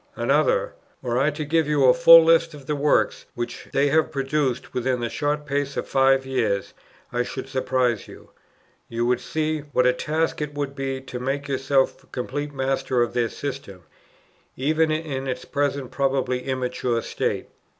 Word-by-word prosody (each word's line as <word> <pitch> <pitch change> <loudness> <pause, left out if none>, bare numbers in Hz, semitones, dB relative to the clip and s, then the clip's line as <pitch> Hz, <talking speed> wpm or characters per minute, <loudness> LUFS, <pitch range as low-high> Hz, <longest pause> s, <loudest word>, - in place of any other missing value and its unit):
Another: - - +1 0.3
"Were 120 -1 0
I 140 +3 +3
to 150 0 -4
give 160 +1 +1
you 150 -3 +3
a 125 - +7
full 165 -1 +9
list 165 0 +3
of 140 -2 -12
the 150 - -1
works, 145 +1 +1
which 120 0 -5
they 140 +1 +2
have 160 +2 +2
produced 135 -2 -1
within 125 0 0
the 120 -1 -2
short 150 0 -1
space 140 -1 -2
of - - -3
five 135 0 +3
years, 115 -7 -1 0.4
I 125 - +1
should 130 +2 -5
surprise 130 -4 0
you. - - -14 0.6
You 115 +1 -1
would 125 0 +2
see 155 +3 -2
what 145 -3 0
a 125 - +5
task 155 +5 -1
it 145 -1 -4
would 145 -1 -3
be 135 -1 -3
to 130 -2 -7
make 135 +3 -2
yourself 135 0 0
complete 145 +4 -4
master 135 -2 0
of 120 - -4
their 120 -2 +1
system, 135 -11 -7 0.7
even 155 +4 +2
in 155 -4 -2
its 125 -1 -4
present 140 -2 -2
probably 135 -2 0
immature 125 -2 -1
state. - - -2
135 Hz, 170 wpm, -24 LUFS, 125-150 Hz, 0.7 s, full